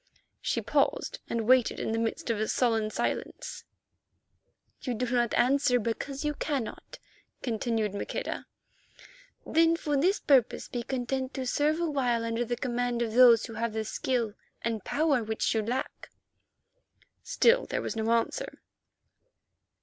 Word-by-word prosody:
She - - -1
paused - - 0
and 230 -1 -1
waited 255 -2 +4
in - - -2
the 225 - 0
midst 230 +1 -1
of 220 - -1
a 215 - 0
sullen 225 -3 +1
silence. - - -4 1.2
"You 250 -3 -2
do 250 +3 -1
not 240 -2 +2
answer 250 0 +3
because 270 +6 -3
you 295 - +1
cannot," 275 -5 -4 0.5
continued 225 -3 -1
Maqueda. 200 - -4 1.0
"Then 330 +1 +4
for 300 -3 -2
this 360 +9 +2
purpose 265 -5 +2
be 240 - -4
content 260 +2 -3
to 265 - -3
serve 300 +5 +1
awhile 260 -8 0
under 230 +1 -1
the 240 +1 -2
command 245 -1 -1
of 225 -2 -3
those 240 -2 +7
who 230 - -9
have 230 0 -2
the 220 0 -2
skill 230 -1 -1 0.3
and 225 -3 -2
power 285 -5 +1
which 220 0 -1
you 220 - +1
lack." 240 +5 -4 1.1
Still - - +3
there - - -2
was - - -3
no 220 0 -1
answer. 235 - 0
245 Hz, 145 wpm, -29 LUFS, 225-270 Hz, 1.2 s, those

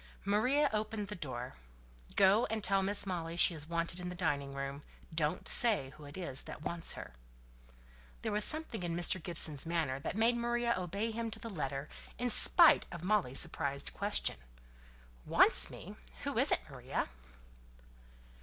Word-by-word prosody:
Maria 250 +9 +2
opened 215 -1 -3
the 210 - -4
door. 130 -8 -6 0.6
"Go 200 +4 +4
and 220 -1 -3
tell 195 +1 +2
Miss 200 +2 0
Molly 170 -3 -4
she's 160 -3 +3
wanted 170 +1 -2
in 180 0 -5
the 180 - -6
dining 145 -6 -2
room. 140 +1 -5 0.3
Don't 155 -1 -1
say 205 - +3
who 150 0 -14
it 145 +3 -9
is 140 -8 -4
that 150 - -9
wants 170 0 -3
her." - - -9 1.1
There - - -2
was 210 0 +3
something 310 -8 -1
in 170 -1 -3
Mr. 175 +1 +1
Gibson's 160 -3 +1
manner 160 -6 -1
that 170 - -5
made 230 +2 +3
Maria 240 0 0
obey 200 +5 -3
him 230 +1 -3
to 220 - -6
the 230 +1 -7
letter, 140 -4 -4 0.3
in 245 0 +1
spite 335 +8 +7
of 170 -1 -8
Molly's 185 -10 +1
surprised 140 -4 -2
question, - - 0 0.9
"Wants - - +4
me? - - -10 0.3
Who - - -3
is - - +3
it, - - +2
Maria?" - - -4
180 Hz, 165 wpm, -33 LUFS, 150-215 Hz, 1.1 s, spite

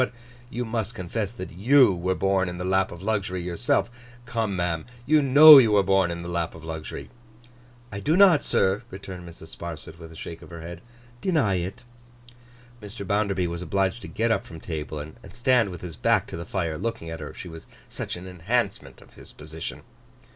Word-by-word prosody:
But 125 - 0 0.4
you 125 0 -3
must 115 0 -3
confess 100 +2 -3
that 95 -6 -8
you 120 +5 +5
were 90 +1 -1
born 95 -1 +1
in 90 - -6
the 90 - -4
lap 95 0 +1
of 85 +1 -10
luxury, 95 -4 -1
yourself. 90 +8 0 0.4
Come, 115 -4 -2
ma'am, 85 -2 -1 0.2
you 155 +3 +4
know 145 +2 +10
you 115 -5 +4
were 100 -1 +5
born 95 -1 +3
in 85 0 -5
the - - -7
lap 85 -1 -2
of 80 - -12
luxury.' 80 -1 -7 0.8
'I 100 - -5
do 155 - +1
not, 185 -6 +7
sir,' 95 +3 +1
returned 95 -2 -9
Mrs. 80 -1 -13
Sparsit 80 -1 -8
with 80 -1 -11
a - - -13
shake 80 +1 -8
of - - -13
her 85 -1 -9
head, 85 +1 -8 0.4
'deny 155 - +2
it.' 90 +6 -5 1.0
Mr. 105 0 -7
Bounderby 100 -2 0
was 85 0 -4
obliged 95 +5 0
to - - -8
get 115 +1 0
up - - +1
from 80 - -11
table, 75 -2 -5
and 75 +1 -7 0.2
stand 120 -3 +3
with 90 -3 -8
his 85 -4 -8
back - - +2
to - - -8
the 85 +1 -6
fire, 80 -4 -2
looking 115 -8 -4
at 80 - -6
her; - - -7
she - - -8
was 80 -1 -11 0.2
such - - -5
an 90 +1 -9
enhancement 100 +4 -2
of - - -19
his - - -11
position. 80 +2 -7
95 Hz, 205 wpm, -25 LUFS, 85-110 Hz, 1.0 s, know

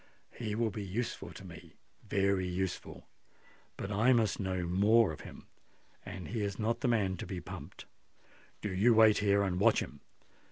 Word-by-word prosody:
He 110 -3 -4
will 115 -1 0
be 105 +1 -5
useful 105 +6 -4
to - - -11
me—very 100 -2 -3
useful. 90 0 -4 0.7
But 100 - -5
I 115 +6 +4
must 115 -4 +1
know 95 -2 -1
more 100 +4 +4
of 75 - -8
him—and 95 -2 -12
he 110 +1 -2
is 100 -1 -2
not 115 +1 -1
the 135 - +1
man 100 -6 +1
to - - -6
be 95 - -4
pumped. 85 - -9 0.8
Do 105 -3 -3
you 110 +5 +4
wait 110 -1 +6
here, 100 -1 +3
and 90 -2 -1
watch 110 +2 +4
him. 70 - -7
100 Hz, 165 wpm, -32 LUFS, 95-110 Hz, 0.8 s, wait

